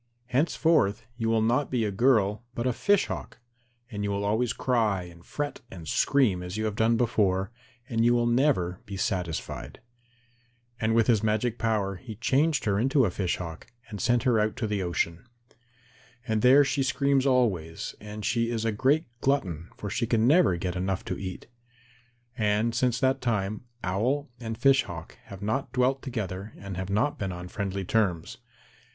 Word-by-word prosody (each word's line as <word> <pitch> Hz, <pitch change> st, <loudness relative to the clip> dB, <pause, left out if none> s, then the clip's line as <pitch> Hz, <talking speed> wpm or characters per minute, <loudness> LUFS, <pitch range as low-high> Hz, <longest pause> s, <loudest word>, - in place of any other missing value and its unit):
Henceforth 145 Hz, -5 st, +2 dB
you 115 Hz, -1 st, -1 dB
will 115 Hz, -1 st, +2 dB
be 110 Hz, -, +2 dB
not 130 Hz, +4 st, +1 dB
a -, -, -2 dB
girl 110 Hz, -1 st, +2 dB
but 120 Hz, -, -2 dB
a 125 Hz, -, +2 dB
Fish 205 Hz, -, +2 dB
Hawk, -, -, -6 dB, 0.5 s
and 105 Hz, -2 st, -4 dB
you 100 Hz, -, -1 dB
will 100 Hz, 0 st, -1 dB
always 110 Hz, +3 st, +1 dB
cry 110 Hz, -8 st, +1 dB
and 85 Hz, -1 st, -13 dB
fret 145 Hz, +7 st, -4 dB
and 85 Hz, -4 st, -10 dB
scream 110 Hz, -, +2 dB
as 90 Hz, +3 st, -5 dB
you 110 Hz, -, -1 dB
have 105 Hz, -2 st, -2 dB
done 115 Hz, +1 st, +3 dB
before, 100 Hz, -5 st, +1 dB, 0.4 s
and 115 Hz, -1 st, 0 dB
you 120 Hz, +1 st, +4 dB
will 120 Hz, 0 st, +2 dB
never 120 Hz, -8 st, +2 dB
be 100 Hz, -1 st, -6 dB
satisfied." 90 Hz, -4 st, -3 dB, 1.0 s
And 110 Hz, 0 st, +1 dB
with 115 Hz, -1 st, +4 dB
his 110 Hz, -4 st, +3 dB
magic 110 Hz, +2 st, 0 dB
power 105 Hz, -4 st, 0 dB
he 110 Hz, +5 st, -9 dB
changed 140 Hz, +7 st, +1 dB
her 100 Hz, -2 st, +1 dB
into 135 Hz, +2 st, +3 dB
a 95 Hz, -, 0 dB
Fish 90 Hz, -1 st, -1 dB
Hawk, 85 Hz, -3 st, -7 dB, 0.2 s
and 105 Hz, -3 st, -6 dB
sent 120 Hz, 0 st, +2 dB
her 125 Hz, -4 st, +3 dB
out 105 Hz, 0 st, 0 dB
to -, -, -2 dB
the 105 Hz, -2 st, -1 dB
ocean. 85 Hz, +1 st, -2 dB, 1.0 s
And 110 Hz, -2 st, +1 dB
there 135 Hz, +4 st, +7 dB
she 135 Hz, +1 st, 0 dB
screams 135 Hz, +1 st, +2 dB
always, 95 Hz, -11 st, 0 dB
and 105 Hz, 0 st, -7 dB
she 115 Hz, 0 st, +1 dB
is 115 Hz, -1 st, -2 dB
a 115 Hz, -, +2 dB
great 135 Hz, +9 st, +2 dB, 0.2 s
glutton, 90 Hz, -, 0 dB
for 100 Hz, -, -5 dB
she 115 Hz, +2 st, -1 dB
can 115 Hz, -1 st, +2 dB
never 145 Hz, -, +4 dB
get 90 Hz, +1 st, -3 dB
enough 95 Hz, +1 st, -2 dB
to -, -, -4 dB
eat. 95 Hz, -2 st, -6 dB, 0.9 s
And 110 Hz, 0 st, +1 dB
since 125 Hz, 0 st, +1 dB
that 130 Hz, 0 st, +2 dB
time, 110 Hz, -2 st, -1 dB, 0.2 s
Owl 125 Hz, +10 st, 0 dB
and 115 Hz, -2 st, -5 dB
Fish 135 Hz, +2 st, +5 dB
Hawk 85 Hz, -3 st, -9 dB
have 100 Hz, 0 st, -10 dB
not 120 Hz, +7 st, -1 dB
dwelt 130 Hz, +2 st, +1 dB
together 105 Hz, -5 st, -5 dB
and 100 Hz, -1 st, -7 dB
have 95 Hz, +1 st, -4 dB
not 110 Hz, +9 st, 0 dB
been 95 Hz, -2 st, -2 dB
on 90 Hz, 0 st, -7 dB
friendly 100 Hz, -1 st, -3 dB
terms. 95 Hz, -5 st, 0 dB
110 Hz, 180 wpm, -27 LUFS, 95-125 Hz, 1.0 s, there